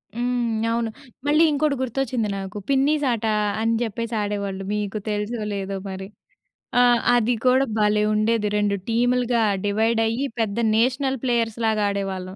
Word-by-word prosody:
హ్మ్. 240 Hz, -2 st, -1 dB
అవును. 230 Hz, -1 st, 0 dB, 0.4 s
మళ్ళీ 305 Hz, +2 st, +5 dB
ఇంకొకడి 295 Hz, 0 st, +1 dB
గుర్తొచ్చింది 250 Hz, -3 st, -1 dB
నాకు. 195 Hz, +2 st, -6 dB
పిన్నీసాట 275 Hz, -4 st, +1 dB, 0.4 s
అని 230 Hz, +1 st, +1 dB
చెప్పేసి 230 Hz, +1 st, -4 dB
ఆడేవాళ్ళు. 200 Hz, -2 st, -3 dB
మీకు 210 Hz, 0 st, -2 dB
తెలుసో 210 Hz, +2 st, -2 dB
లేదో 195 Hz, 0 st, -3 dB
మరి! 190 Hz, 0 st, -6 dB, 0.7 s
ఆ! -, -, +7 dB, 0.3 s
అది 240 Hz, 0 st, +2 dB
కూడా 260 Hz, +2 st, +4 dB
భలే 210 Hz, 0 st, +3 dB
ఉండేది. 215 Hz, 0 st, +1 dB
2 205 Hz, -1 st, +1 dB
టీములుగా 245 Hz, 0 st, +2 dB, 0.2 s
డివైడ్ 220 Hz, +3 st, +1 dB
అయ్యి 235 Hz, +5 st, -1 dB
పెద్ద 220 Hz, -2 st, -1 dB, 0.2 s
నేషనల్ 260 Hz, +3 st, +1 dB
ప్లేయర్స్ 235 Hz, -3 st, 0 dB
లాగా 215 Hz, -1 st, +1 dB
ఆడేవాళ్ళం. 195 Hz, -2 st, -4 dB
225 Hz, 135 wpm, -23 LUFS, 210-245 Hz, 0.7 s, ఆ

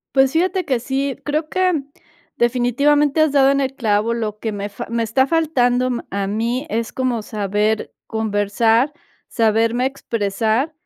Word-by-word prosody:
Pues 270 Hz, 0 st, +5 dB
fíjate 365 Hz, +3 st, +1 dB
que 260 Hz, -4 st, 0 dB
sí, 265 Hz, +2 st, -2 dB
creo 305 Hz, +2 st, -1 dB
que 370 Hz, +2 st, +1 dB, 0.6 s
definitivamente, 275 Hz, +5 st, +2 dB
has 310 Hz, -2 st, +3 dB
dado 275 Hz, -1 st, +5 dB
en 275 Hz, 0 st, +2 dB
el 270 Hz, -1 st, -1 dB
clavo, 220 Hz, -2 st, +1 dB
lo 215 Hz, -2 st, -3 dB
que 220 Hz, 0 st, -3 dB
me 205 Hz, 0 st, -4 dB
fa 200 Hz, -, -7 dB
me 230 Hz, +1 st, -1 dB
está 230 Hz, +4 st, +2 dB
faltando 255 Hz, -6 st, +1 dB, 0.2 s
a 200 Hz, 0 st, -2 dB
mí, 235 Hz, +7 st, -2 dB
es 230 Hz, -3 st, -2 dB
como 255 Hz, -3 st, -1 dB
saber 210 Hz, +1 st, -1 dB
conversar, 225 Hz, +4 st, +1 dB, 0.3 s
saberme 230 Hz, +2 st, +1 dB
expresar, 230 Hz, +1 st, -1 dB
240 Hz, 150 wpm, -20 LUFS, 220-275 Hz, 0.6 s, Pues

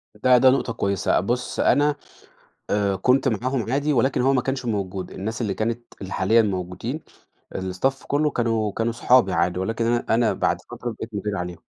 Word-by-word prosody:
ده 125 Hz, +3 st, +4 dB
ده 130 Hz, +1 st, +6 dB
نُقطة 130 Hz, -3 st, +1 dB
كويّسة. 100 Hz, -3 st, +1 dB
بٌص، 120 Hz, +6 st, -2 dB
أنا 145 Hz, 0 st, +3 dB, 0.8 s
آآ، 100 Hz, -2 st, +1 dB
كنت 130 Hz, +5 st, +2 dB
معاهم 125 Hz, +1 st, -1 dB
عادي 145 Hz, +2 st, +1 dB
ولكن 130 Hz, +1 st, +2 dB
هو 135 Hz, +2 st, +3 dB
ما 125 Hz, -2 st, +2 dB
كانش 135 Hz, -1 st, -3 dB
موجود، 95 Hz, -4 st, -3 dB
الناس 110 Hz, +5 st, -5 dB
اللي 100 Hz, -4 st, -1 dB
كانت، 115 Hz, +2 st, -3 dB
اللي 95 Hz, -, -7 dB
حاليًا 110 Hz, +5 st, +3 dB
موجودين 95 Hz, -, -3 dB, 0.5 s
الStaff 95 Hz, +9 st, -2 dB
كُلّه 150 Hz, +1 st, +1 dB
كانوا 115 Hz, -4 st, 0 dB
كانوا 115 Hz, +1 st, -1 dB
صُحابي 115 Hz, -4 st, +3 dB
عادي، 85 Hz, +2 st, +1 dB
ولكن 115 Hz, +4 st, -1 dB
أنا 120 Hz, 0 st, +1 dB
أنا 115 Hz, 0 st, +3 dB
بَعْد -, -, 0 dB
فترة 120 Hz, -, -5 dB
بقيت 110 Hz, 0 st, -8 dB
مدير 105 Hz, 0 st, -2 dB
عليهم، 90 Hz, -1 st, -5 dB
115 Hz, 180 wpm, -23 LUFS, 100-130 Hz, 0.8 s, ده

